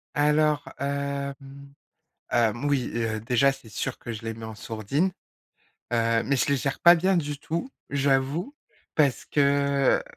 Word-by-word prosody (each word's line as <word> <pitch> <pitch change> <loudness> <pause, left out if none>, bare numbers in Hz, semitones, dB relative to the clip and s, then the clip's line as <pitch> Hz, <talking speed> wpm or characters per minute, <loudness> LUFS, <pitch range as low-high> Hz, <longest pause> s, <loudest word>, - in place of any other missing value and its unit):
Alors, 150 0 +3 0.2
hem, 140 0 -2 1.0
hem, 120 +2 +1
oui, 140 -4 +1
heu, 115 -2 -1
déjà 125 +4 +3
c'est 135 -4 -12
sûr 125 +5 -4
que 120 - -6
je 115 0 -7
les 115 0 -3
mets 110 0 -8
en 110 - -8
sourdine, 115 - -1 0.8
heu, 115 -1 +2
mais 140 - +1
je - - +1
les 140 - +3
gère 135 +1 -2
pas 175 0 +9
bien 185 +2 +2
du 145 -3 -3
tout, 165 - -3 0.2
j'avoue. 140 - 0 0.4
Parce 145 -4 +2
que, 140 -1 +2
140 Hz, 155 wpm, -26 LUFS, 120-145 Hz, 1.0 s, pas